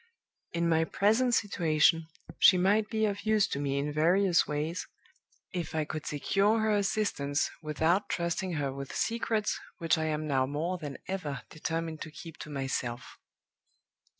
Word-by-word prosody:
In 170 0 0
my 160 -1 +3
present 225 +8 +2
situation, 165 -5 +2 0.3
she 185 - +7
might 205 +4 +2
be 220 -1 +1
of 205 -1 -2
use 215 -2 +3
to 140 - -2
me 140 -1 -1
in 145 +1 -1
various 175 +4 +3
ways, 150 +4 -2 0.7
if 170 -3 -4
I 155 -1 +1
could 155 0 -5
secure 195 +9 +2
her 220 0 +2
assistance, 195 -8 0
without 160 +5 +1
trusting 175 +1 -1
her 140 -4 -1
with 140 0 -7
secrets 225 -2 0 0.2
which 165 -2 +1
I 160 - 0
am 155 0 -1
now 135 -3 +1
more 165 +6 -2
than 145 -3 -6
ever 155 -8 -4
determined 165 0 -3
to 160 - -5
keep 160 +2 -10
to - - -8
myself. 130 -3 -4
165 Hz, 155 wpm, -30 LUFS, 150-195 Hz, 0.7 s, she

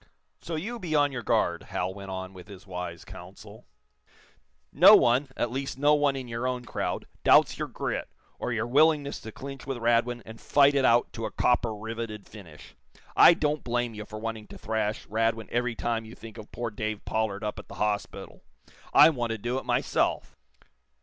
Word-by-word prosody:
"So 165 - -5
you 225 +10 -4
be 170 -6 -3
on 145 -1 +3
your 125 -3 -4
guard," 105 -8 +1
Hal 95 0 -3
went 100 0 -9
on 95 0 -6
with 90 -1 -12
his 100 -2 -12
wise 90 -3 -6
counsel. - - -12 1.1
"No - - +9
one 125 +4 +3
at 120 - -1
least, 135 +1 -4
no 145 +2 +4
one 145 -2 +2
in 130 -2 -5
your 120 +2 -3
own 125 -1 -3
crowd - - -3 0.2
doubts - - +5
your - - -2
grit, - - -4 0.3
or - - -3
your 115 -1 -1
willingness 145 +2 +2
to 110 - -9
clinch 135 +3 -9
with 135 -2 -3
Radwin 120 0 +1
and 110 0 -11
fight 145 0 +4
it 135 -2 +2
out 120 0 +3
to 115 - -4
a - - -9
copper 120 -3 +1
riveted 110 -1 -6
finish. 85 -8 -13 0.4
I 170 - +8
don't 150 -1 -1
blame 120 -1 -1
you 105 0 -7
for 110 - -9
wanting 110 -1 -5
to - - -11
thrash 110 -1 -2
Radwin 115 +1 -1
every 120 0 -1
time 115 0 -2
you 110 +1 -11
think 115 0 -11
of 110 - -12
poor 120 -1 -4
Dave 110 0 -4
Pollard 110 -2 -2
up 105 - -3
at - - -11
the - - -11
hospital. 105 -1 -3 0.5
I 155 +2 +9
want 120 -5 -2
to - - -4
do 120 +5 -2
it - - -12
myself. - - 0
115 Hz, 195 wpm, -27 LUFS, 105-130 Hz, 1.1 s, No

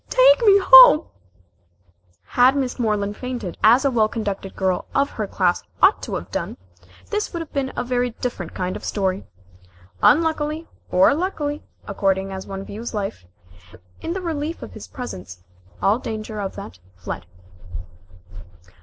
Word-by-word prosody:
Take - - +5
me 400 -3 +7
home - - +9 0.6
" 90 0 -39 0.2
Had 255 +3 +6
Miss 265 -2 -2
Moreland 210 -3 -1
fainted, 245 -8 -5
as 240 +6 +6
a 275 - +3
well 220 -3 +3
conducted 205 -4 -5
girl 190 -2 -1
of 280 +1 +2
her 215 -2 -4
class 180 -2 0 0.2
ought - - +4
to - - -5
have - - -6
done, - - -4 0.5
this 420 0 -2
would 340 - -4
have 325 -2 -8
been 270 -2 -1
a - - -2
very 245 0 0
different 225 -7 -6
kind 180 0 -3
of - - -7
a - - -9
story. 190 -2 -2 0.7
Unluckily, 315 +1 +2 0.2
or 185 +9 +4
luckily, 300 -3 -3 0.3
according 195 -1 0
as 190 0 -7
one 195 0 -6
views 225 +3 -7
life 195 - -4 0.8
in 335 - -3
the 380 - -4
relief 325 -1 -4
of - - -10
his - - -10
presence, 90 - -8 0.4
all 210 +4 +3
danger 215 -2 -6
of 195 - -5
that 90 - -9 0.2
fled. 85 -1 -7
225 Hz, 160 wpm, -22 LUFS, 190-290 Hz, 0.8 s, home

